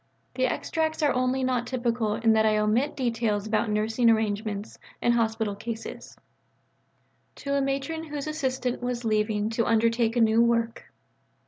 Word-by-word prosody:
The 255 0 +1
extracts 315 +2 -2
are 290 - +3
only 255 +1 0
not 250 -2 0
typical 235 -4 -1
in 225 -1 +3
that 220 0 +3
I 215 -1 +3
omit 225 +8 +1
details 230 -5 0
about 215 +1 0
nursing 220 +3 +2
arrangements 215 -1 -1 0.2
and 240 - +2
hospital 220 -2 0
cases: 225 +2 -7 1.2
(_To 280 0 -3
a 280 - +2
Matron 275 +4 -2
whose 290 -2 -5
assistant 260 -5 -2
was 245 -1 -3
leaving 215 0 0
to 230 0 0
undertake 230 0 +2
a 240 - +3
new 225 0 +4
work. 230 -1 +1
230 Hz, 150 wpm, -26 LUFS, 220-255 Hz, 1.2 s, new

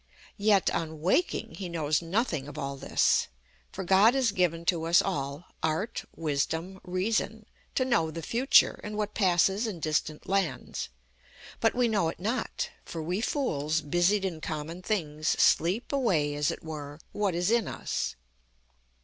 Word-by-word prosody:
Yet, 205 -2 +3
on 160 -1 -3
waking, 225 - +1
he 185 -3 -4
knows 155 -2 0
nothing 170 - -1
of 145 0 -9
all 140 -2 -3
this. 135 - +2 0.4
For - - -5
God 195 +7 +5
has 260 -5 +2
given 170 -3 0
to 165 -2 +1
us 170 +1 +5
all 140 +4 -2 0.2
Art, 160 +9 -1
Wisdom, 165 +4 -2
Reason 210 +4 -1 0.3
to 255 - +2
know 165 -11 +2
the 165 +1 -6
future, 250 - +4
and 210 0 -5
what 210 0 -2
passes 195 +3 +3
in 195 -6 -5
distant 155 -1 -1
lands; 185 -10 -1 0.7
but 225 - +2
we 245 -1 +3
know 200 -7 +1
it - - -7
not, 225 +6 -2
for 165 -2 -6
we 180 +6 -1
fools, 160 - 0
busied 175 +6 +2
in 165 -4 -3
common 160 +3 -5
things, 155 -7 -2
sleep 185 +9 +3
away, 180 - +2
as 145 0 +1
it - - -5
were, 150 -2 -7
what 205 -4 0
is 175 +4 +1
in 235 -3 +2
us. - - -3
175 Hz, 160 wpm, -29 LUFS, 155-210 Hz, 0.7 s, God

